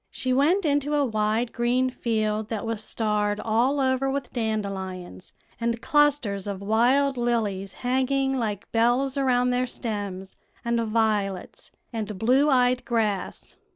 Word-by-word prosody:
She 255 0 -2
went 325 +9 +3
into 290 0 +1
a 290 -1 +2
wide 220 +1 0
green 250 +2 +1
field 215 -3 -1
that 225 -2 -3
was 225 -1 -2
starred 210 -2 0
all 235 +6 +1
over 260 0 +1
with 275 0 -3
dandelions, 195 - -4 0.3
and 235 0 -1
clusters 275 -10 +1
of 200 -2 -4
wild 250 +7 +2
lilies 215 -5 -1
hanging 265 +1 +1
like 215 -5 -3
bells 245 +4 +2
around 250 -2 +2
their 250 +1 0
stems, 200 -5 -4 0.3
and 235 0 +1
violets, 215 -4 -1 0.2
and 215 -3 -4
blue 260 +8 +3
eyed 250 -2 +3
grass. 215 -6 -2
230 Hz, 135 wpm, -25 LUFS, 210-260 Hz, 0.3 s, went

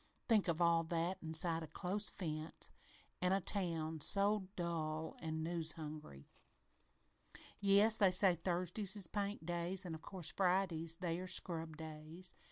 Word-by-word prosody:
Think 215 -5 +3
of 170 0 +1
all 170 -1 +4
that 170 +3 -1
inside 165 +1 +3
a 160 - -6
close 200 +6 -1
fence, 155 -3 -6 0.5
an' 180 +1 +2
a 195 - +3
town 165 -5 -1
so 200 +3 +5
dull 160 -2 -3
an' 160 -1 -3
news 165 -1 -1
hungry 150 - -9 1.3
"Yes, 205 +2 +4
they 200 -3 +6
say 185 0 +4
Thursdays 180 +3 -2
is 200 -3 +2
paint 200 -1 -3
days, 175 +2 -1
an', 170 - -5
of 160 - -7
course, 180 -4 -2
Fridays, 180 -4 +1
they 170 -1 -2
are 185 - -6
scrub 165 -3 -1
days. 160 +3 -6
170 Hz, 150 wpm, -38 LUFS, 160-190 Hz, 1.3 s, they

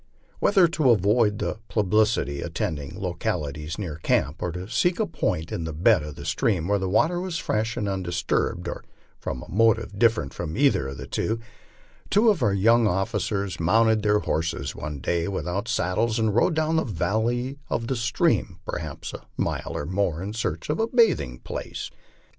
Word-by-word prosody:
Whether 190 -4 +5
to 155 -5 +2
avoid 105 0 +3
the - - -3
publicity 105 -8 +1
attending 75 -3 -4
localities 75 +2 -3
near 85 -7 -4
camp, 80 0 0
or 90 - -1
to 90 +2 -6
seek 170 +10 +1
a 220 - +2
point 85 - -2
in 85 - -3
the 80 -1 -4
bed 90 +4 +4
of 75 -1 -7
the - - -9
stream 90 -7 0
where 100 0 +2
the 95 -1 -2
water 165 - +2
was 180 -3 -3
fresh 110 -5 -1
and 105 -4 -1
undisturbed, 90 -3 -1
or - - -5 0.4
from 65 -2 -4
a - - -12
motive 105 -1 +2
different 110 - +2
from 80 -2 -5
either 135 - +3
of 65 0 -6
these, 65 - -2 0.7
two 220 +3 +5
of 185 -8 -2
our 105 - +3
young 115 +4 +4
officers 100 -1 -1
mounted 110 +6 +3
their 105 0 +3
horses 80 +1 -2
one 75 -1 -5
day 85 +3 0
without 100 +2 -2
saddles 110 +2 0
and 110 -2 +1
rode 155 - +3
down 160 +1 +1
the 160 - +2
valley 120 - -1
of 115 - -1
the 130 - -1
stream 115 -1 +1
perhaps - - -5
a - - -9
mile - - -2
or 70 - -3
more 90 -2 0
in 100 +2 -4
search 85 -8 -3
of 155 - -2
a 225 - +2
bathing 150 - +2
place. - - -6
105 Hz, 180 wpm, -25 LUFS, 85-115 Hz, 0.7 s, Whether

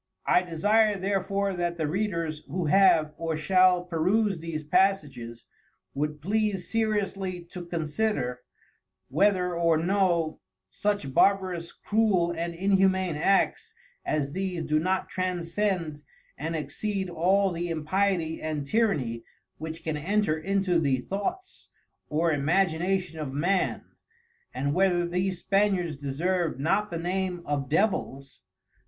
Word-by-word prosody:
I 180 - +4
desire 205 +5 +2
therefore 195 +1 -1
that 175 -1 -2
the 160 - -1
Readers 170 -3 -2
who 180 -1 -2
have 155 -3 +4
or 165 -1 -2
shall 185 +1 +4
peruse 185 +3 +1
these 160 -1 -5
passages, 145 -9 0 0.5
would 150 +1 -3
please 205 -1 -1
seriously 200 -5 -1
to 175 -2 -7
consider 155 - -1 0.7
whether 180 +3 +2
or 170 -1 +3
no, 175 -2 +1 0.3
such 205 -10 -2
Barbarous, 185 -3 +2
Cruel 205 -6 +1
and 170 +1 -3
Inhumane 190 -1 +2
Acts 440 - +1 0.3
as 140 -2 -1
these 185 -1 -3
do 155 0 +1
not 185 +3 0
transcend 180 -3 -2 0.3
and 160 +2 -4
exceed 190 +7 -3
all 185 +3 +2
the 175 0 -3
impiety 165 +1 0
and 155 -2 -3
tyrrany, 140 - 0 0.4
which 160 +1 -6
can 160 -2 -2
enter 195 +1 +1
into 185 +1 +1
the 140 -5 +2
thoughts 355 - -5 0.4
or 165 +2 +1
imagination 175 +3 0
of 150 -3 -4
Man, 180 +6 0 0.7
and 140 +1 -1
whether 180 -1 +2
these 180 +1 -1
Spaniards 195 -5 +1
deserve 155 +3 -1
not 195 +8 +1
the 170 - -4
name 180 +1 -2
of 140 -3 -2
Devils. 150 -7 -1
175 Hz, 125 wpm, -27 LUFS, 155-195 Hz, 0.7 s, I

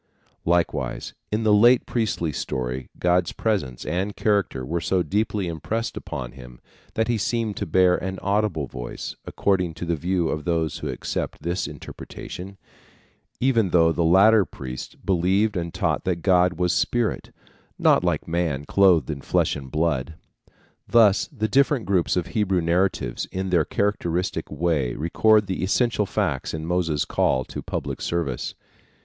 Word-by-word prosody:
Likewise 80 -6 0 0.2
in 110 +2 0
the 110 -1 +4
late 120 +4 +6
priestly 105 -9 -1
story 65 -2 -4
God's 90 +1 +2
presence 95 - -2
and 95 +3 -2
character 100 - 0
were 85 +5 -2
so 90 +1 +1
deeply 100 +2 -1
impressed 105 +8 -3
upon 60 -2 -6
him 60 -1 -13 0.4
that 110 - +1
he 120 -2 0
seemed 115 -1 -1
to - - -3
bear 90 -1 +4
an 95 +1 -4
audible 100 -7 0
voice, - - -7
according 90 -5 0
to 85 - -5
the 85 0 0
view 85 +2 0
of 75 - -3
those 80 -2 -1
who - - -4
accept - - -4
this 85 +3 -1
interpretation, 95 +2 -9 0.8
even 115 -6 +2
though 85 -1 +4
the 85 +1 0
later 100 +6 +6
priests 65 -7 -8
believed 95 +4 +1
and 85 -2 -2
taught 80 -4 -1
that 90 -3 -2
God 90 -1 +4
was 90 0 0
a - - +1
spirit, 120 -2 0 0.5
not - - +4
like - - 0
man 80 -4 -1
clothed 90 -3 +4
in 70 -2 -6
flesh - - +1
and 70 -2 -8
blood. 75 -1 -1 0.7
Thus 105 -4 +5
the 110 0 -2
different 135 +1 +2
groups 95 -2 +1
of 90 - 0
Hebrew 95 -5 +1
narratives 85 -7 0
in 95 0 -3
their 85 -4 +3
characteristic 90 -3 -1
way 75 -8 0
record 105 +7 +3
the 95 -1 -3
essential 105 +1 +1
facts 80 -11 -1
in 80 0 -5
Moses' 85 -4 0
call 65 -1 +1
to - - -7
public - - -4
service. 85 -7 -2
90 Hz, 155 wpm, -24 LUFS, 80-100 Hz, 0.8 s, late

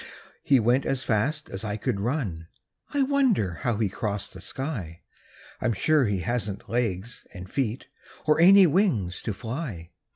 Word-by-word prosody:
He 135 -2 +4
went 120 +4 +3
as 135 -1 0
fast 135 +8 0
as 95 - -4
I 105 -1 -3
could 110 -2 -2
run; 100 - -2 0.4
I 285 -2 +2
wonder 255 - +1
how 120 -3 0
he 110 -1 +1
crossed 100 0 -4
the 95 - -10
sky? 105 - -5 0.6
I'm 120 - +1
sure 150 +6 +3
he 100 -4 -1
hasn't 105 -1 -3
legs 115 -2 -2
and 90 0 -8
feet 120 +2 -2 0.4
Or 155 0 +3
any 195 +2 +8
wings 145 - +1
to - - -3
fly. 110 - -6
115 Hz, 160 wpm, -26 LUFS, 100-145 Hz, 0.6 s, any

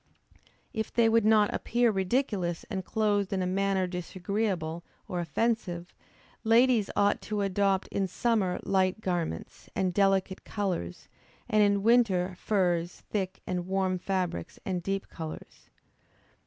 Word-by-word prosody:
If 220 -1 -3
they 230 -1 +4
would 225 -1 +3
not 215 -1 +4
appear 240 0 +2
ridiculous 190 -4 -1
and 190 -2 -2
clothed 205 -1 0
in 190 -2 0
a - - 0
manner 190 0 +1
disagreeable 180 -1 -2 0.2
or 180 - -3
offensive, 175 0 -1 0.5
ladies 230 -1 +4
ought 205 0 +2
to 210 -1 -2
adopt 195 0 +1
in 195 -1 -1
summer 195 -2 0
light 190 +1 +1
garments, 175 - -3
and 185 -1 0
delicate 195 -1 +2
colors, 185 - -3 0.4
and 215 0 +3
in 200 -1 +3
winter, 205 -6 +3
furs, 175 -4 0
thick 190 -3 -2
and 180 -1 -3
warm 190 -1 0
fabrics, 180 - -2
and 185 -2 -1
deep 195 +2 -2
colors. 160 -2 -9
195 Hz, 130 wpm, -29 LUFS, 180-210 Hz, 0.5 s, they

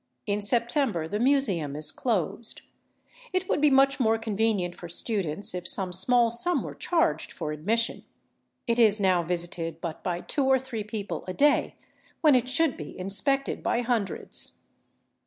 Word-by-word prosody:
In 205 0 -1
September 235 - 0
the 205 +5 -3
Museum 215 - +1
is 150 +1 -3
closed. 225 -1 -2 0.7
It 370 0 0
would - - 0
be 300 - +6
much 275 +1 +4
more 225 -2 +3
convenient 215 -4 0
for 175 - -10
students 190 -2 -2
if 180 -1 -4
some 185 -2 +1
small 235 +5 +3
sum 340 +10 +1
were - - -6
charged 335 -1 0
for 150 - -5
admission. 215 +10 0 0.6
It 235 -1 0
is 215 -2 +5
now 185 -3 +3
visited 170 -1 -3
but 165 -1 -6
by 175 -1 -2
two 280 - -1
or 265 0 +5
three 250 -4 -5
people 210 -1 -5
a 185 - -3
day, 290 0 +3 0.5
when 305 -3 +6
it 250 0 +2
should 280 +2 +2
be 150 - -8
inspected 205 +9 -1
by 240 - 0
hundreds. 230 -5 0
220 Hz, 160 wpm, -27 LUFS, 180-260 Hz, 0.7 s, be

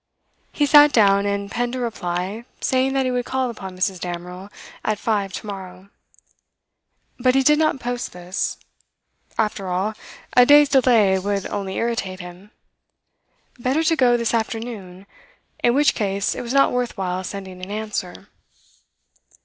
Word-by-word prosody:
He 295 - +1
sat 295 0 +7
down 200 -4 +4
and 200 0 -2
penned 245 +1 -2
a - - -3
reply, 200 -1 -3
saying 260 +1 +1
that 270 -1 +1
he 255 - 0
would 245 -1 -1
call 260 -2 -1
upon 190 -5 -9
Mrs. 185 0 -1
Damerel 180 +2 -6 0.3
at 215 - 0
five 205 -3 -1
to - - -6
morrow. 190 -1 -8 1.3
But 255 +1 +3
he 270 - +4
did 300 +3 +4
not 310 -4 +1
post 245 0 -4
this. 180 +1 -3 0.8
After 210 -3 -1
all, 185 +4 -1 0.4
a 250 - +8
day's 290 +2 +7
delay 230 -8 +4
would 200 0 -2
only 195 -2 -4
irritate 225 -5 -2
him; 180 +3 -11 1.1
better 260 +6 +1
to 325 0 +3
go 245 -5 +4
this 235 -1 -1
afternoon, 220 -5 -4 0.6
in 240 +1 +4
which 295 +1 +4
case 200 -2 -1
it - - -5
was 235 - -5
not 275 +1 +4
worth 250 -2 -2
while 185 -1 -2
sending 190 -1 -7
an 185 - -7
answer. 205 -3 -5
210 Hz, 155 wpm, -22 LUFS, 190-250 Hz, 1.3 s, a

